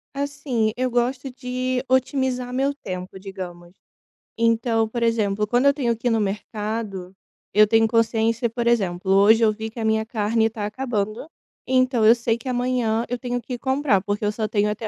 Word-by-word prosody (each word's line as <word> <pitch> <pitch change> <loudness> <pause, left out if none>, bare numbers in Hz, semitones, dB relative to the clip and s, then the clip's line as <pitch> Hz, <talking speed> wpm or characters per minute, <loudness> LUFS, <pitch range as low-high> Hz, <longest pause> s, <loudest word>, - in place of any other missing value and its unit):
Assim, 275 -6 -1
eu 255 0 0
gosto 250 +2 -1
de 255 0 -3
otimizar 260 -1 0
meu 270 +2 +1
tempo, 185 -8 -7
digamos. 180 -3 -8 0.7
Então, 230 0 +2
por 235 +1 -3
exemplo, 210 -3 +1
quando 245 +5 +1
eu 280 - +6
tenho 240 -5 0
que 235 +2 -3
ir - - +4
no 225 -1 +1
mercado, 205 -2 -4 0.4
eu 210 0 +6
tenho 225 +1 +4
consciência, 230 +1 +1
por 235 +1 -3
exemplo, 190 -5 +1
hoje 215 +4 +5
eu 215 - +5
vi 220 +1 -5
que 225 - -20
a - - -2
minha 220 0 +1
carne 225 0 +1
tá 215 -2 -5
acabando, 220 +1 -3 0.4
então 255 -3 +2
eu 230 +2 +8
sei 230 -1 0
que 235 - -11
amanhã 245 -3 0
eu 245 - -3
tenho 245 0 -3
que 245 +2 -7
ir - - -10
comprar, 265 -6 +1
porque 205 +1 -3
eu 210 - +1
só 215 0 -2
tenho 210 0 +1
até 215 +1 -4
230 Hz, 190 wpm, -23 LUFS, 210-250 Hz, 0.7 s, eu